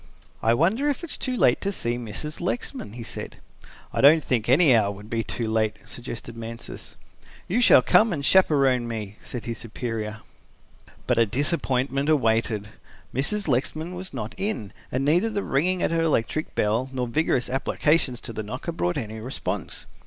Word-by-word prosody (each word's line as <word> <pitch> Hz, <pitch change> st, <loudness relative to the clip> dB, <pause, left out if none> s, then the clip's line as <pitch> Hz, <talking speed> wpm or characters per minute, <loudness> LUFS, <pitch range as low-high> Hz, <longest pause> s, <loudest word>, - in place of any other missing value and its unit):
"I 115 Hz, +1 st, +3 dB
wonder 215 Hz, -, +2 dB
if 290 Hz, +4 st, -2 dB
it 340 Hz, -, -5 dB
is -, -, -3 dB
too 255 Hz, -1 st, -2 dB
late -, -, +4 dB
to 200 Hz, -, -1 dB
see 120 Hz, -10 st, -1 dB
Mrs. 120 Hz, +7 st, -5 dB
Lexman," 185 Hz, -, -3 dB
he 120 Hz, 0 st, -7 dB
said. 120 Hz, -, -7 dB, 0.6 s
"I -, -, 0 dB
don't 150 Hz, +3 st, +7 dB
think 120 Hz, -3 st, 0 dB
any 135 Hz, 0 st, +6 dB
hour 105 Hz, -3 st, +3 dB
would 105 Hz, +2 st, -11 dB
be 115 Hz, -1 st, 0 dB
too 115 Hz, +2 st, -2 dB
late," 110 Hz, -1 st, +1 dB
suggested 120 Hz, -1 st, -7 dB
Mansus. 115 Hz, 0 st, -8 dB, 0.5 s
"You 225 Hz, +7 st, +1 dB
shall -, -, +7 dB
come 220 Hz, 0 st, +5 dB
and 145 Hz, -5 st, -2 dB
chaperon 135 Hz, -10 st, +4 dB
me," 110 Hz, -3 st, -5 dB
said 120 Hz, -3 st, -7 dB
his 115 Hz, -2 st, -4 dB
superior. 110 Hz, -2 st, -5 dB, 0.8 s
But 125 Hz, -2 st, +2 dB
a 115 Hz, -, +4 dB
disappointment 135 Hz, -, 0 dB
awaited. 115 Hz, -6 st, +1 dB, 0.4 s
Mrs. 195 Hz, -, +1 dB
Lexman 155 Hz, +6 st, -1 dB
was 185 Hz, +1 st, -6 dB
not -, -, -5 dB
in 155 Hz, -, -3 dB, 0.2 s
and 130 Hz, +2 st, 0 dB
neither 175 Hz, +10 st, +3 dB
the 205 Hz, -2 st, -2 dB
ringing 180 Hz, +7 st, +1 dB
at -, -, +1 dB
her 165 Hz, 0 st, +1 dB
electric 155 Hz, -1 st, 0 dB
bell 115 Hz, +5 st, +1 dB
nor 130 Hz, -2 st, -2 dB
vigorous 125 Hz, -1 st, +1 dB
applications 135 Hz, 0 st, +1 dB
to 115 Hz, -, -7 dB
the 110 Hz, -, -3 dB
knocker 125 Hz, +10 st, -5 dB
brought 175 Hz, 0 st, -1 dB
any 110 Hz, -4 st, -5 dB
response. 125 Hz, +5 st, -4 dB
130 Hz, 175 wpm, -25 LUFS, 115-165 Hz, 0.8 s, don't